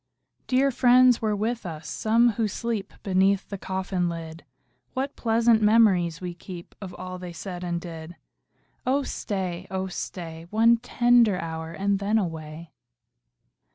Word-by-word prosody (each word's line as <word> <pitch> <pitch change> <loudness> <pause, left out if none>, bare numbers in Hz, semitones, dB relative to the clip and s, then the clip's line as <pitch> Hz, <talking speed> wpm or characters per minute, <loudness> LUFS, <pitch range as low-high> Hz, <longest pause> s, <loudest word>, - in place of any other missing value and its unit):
Dear 270 +2 +3
friends 250 -1 +5
were 215 -2 +1
with 225 +3 -2
us, 160 -4 -7
some 230 +2 +3
who 220 0 -1
sleep 215 -1 -3
Beneath 195 0 +2
the 200 - -4
coffin 190 -2 -2
lid: 165 -1 -7 0.5
What 270 +2 -2
pleasant 225 -1 +3
memories 200 -7 +4
we 180 -1 -5
keep 175 0 -10
Of 185 -3 -7
all 185 0 -7
they 180 -1 -7
said 180 +1 -7
and 175 -1 -2
did! 165 -1 -9 0.7
Oh 275 +2 +1
stay, 185 -6 -4
oh 190 0 -2
stay, 170 -3 -6
One 230 +3 +4
tender 240 -3 +3
hour, 160 -1 -5
and 195 +3 0
then 205 +2 +1
away. 160 -4 -4
190 Hz, 145 wpm, -25 LUFS, 175-225 Hz, 0.7 s, friends